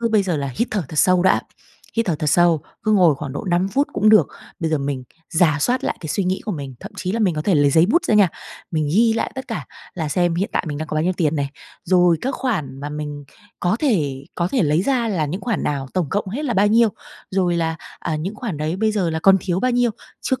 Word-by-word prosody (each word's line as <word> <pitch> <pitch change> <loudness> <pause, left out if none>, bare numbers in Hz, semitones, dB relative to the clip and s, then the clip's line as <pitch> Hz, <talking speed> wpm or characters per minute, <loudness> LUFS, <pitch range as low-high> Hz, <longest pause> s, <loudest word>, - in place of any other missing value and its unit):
cứ 230 - +1
bây 215 -3 +3
giờ 180 -5 -1
là 140 -1 -2
hít 235 - 0
thở 205 -3 -1
thật 155 - -8
sâu 185 -1 +4
đã, 185 - +4 0.6
hít 230 -1 +1
thở 175 - +1
thật 150 - -3
sâu, 170 -4 +4 0.2
cứ 215 - +1
ngồi 180 -7 +5
khoảng 140 -1 -6
độ - - -5
5 175 +2 +2
phút 280 +8 +1
cũng 215 - +2
được. 210 -9 +6 0.3
Bây 160 - -1
giờ 155 - +1
mình 140 -2 -3 0.3
rà 160 -3 +3
soát 250 - +1
lại - - -1
cái 160 - -6
suy 190 +5 0
nghĩ 185 +1 -1
của 215 - -2
mình, 140 -6 -6
thậm - - -9
chí 185 +1 -3
là 230 - -1
mình 185 -6 +2
có 150 - -2
thể 190 -1 +2
lấy 145 -1 +4
giấy 160 +4 +5
bút 340 - +2
ra 220 - +2
nha, 205 -4 +6 0.4
mình 155 -3 0
ghi 225 +2 +4
lại 225 - -2
tất 265 0 -7
cả 230 - -4 0.3
là 160 -4 -3
xem 175 +2 +1
hiện 190 +4 -1
tại - - 0
mình 145 0 -4
đang 155 - -5
có - - -4
bao 155 - +1
nhiêu 185 - +2
tiền 160 -3 0
này. 140 -1 -1 0.3
Rồi 175 -2 +4
các 265 +1 -2
khoản 155 - -3
mà 145 - -4
mình 150 -1 -6 0.4
có 180 +4 +1
thể 145 - 0
có 175 0 0
thể 245 -3 +1
lấy 150 +3 +2
ra 245 0 +1
là 175 -8 0
những 180 +7 -4
khoản 230 -7 -2
nào, 140 -2 -2
tổng 180 -5 0
cộng 205 -1 -1
hết 270 +10 -4
là 245 -6 -1
bao 200 +2 +4
nhiêu, 230 +2 +5 0.4
rồi 180 -2 +1
là, 160 -1 -1 0.2
à, 160 -2 -2
những 185 +8 -4
khoản 210 - -4
đấy 155 +3 -2
bây 215 +2 +1
giờ 185 -6 0
là 160 - -1
còn 195 +3 +6
thiếu 180 -1 -1
bao 255 - +2
nhiêu, 245 -1 +2 0.3
trước 260 0 -1
180 Hz, 275 wpm, -21 LUFS, 155-215 Hz, 0.6 s, được